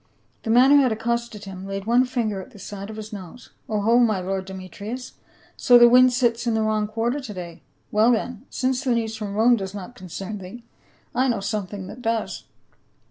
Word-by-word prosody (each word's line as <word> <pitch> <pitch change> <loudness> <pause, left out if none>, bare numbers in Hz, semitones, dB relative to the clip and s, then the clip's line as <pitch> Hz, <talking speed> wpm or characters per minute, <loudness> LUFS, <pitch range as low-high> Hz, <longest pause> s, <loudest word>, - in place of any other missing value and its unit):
The 225 - -6
man 250 +4 +6
who 285 0 +7
had 255 -3 +2
accosted 230 -1 -2
him 190 0 -8
laid 195 0 -4
one 240 +3 +4
finger 225 -6 -2
at - - -12
the - - -16
side 200 +1 -8
of 220 - -7
his 215 0 -8
nose, 195 +4 -10
" - - -36
O 215 -2 0
ho, 230 +4 +4
my 220 -5 +3
lord 190 +1 -3
Demetrius, 200 +6 -7 0.4
so 245 - +6
the 240 0 +8
wind 250 +1 +7
sits 240 -1 +1
in 230 - +2
the 220 - +1
wrong 215 -1 0
quarter 230 +5 -1
to 250 -7 -7
day. 170 -2 -8 0.3
Well 220 +3 +4
then, 245 +1 -2
since 260 +1 -1
the 250 -4 +2
news 225 -1 -2
from 210 -2 -5
Rome 235 +3 +5
does 195 -1 -5
not 200 +4 -7
concern 195 0 -7
thee, 195 +6 -10 0.5
I 255 +2 +2
know 235 -5 0
something 200 -1 -4
that 235 +6 -10
does. 225 -1 -2
220 Hz, 215 wpm, -23 LUFS, 200-240 Hz, 0.5 s, the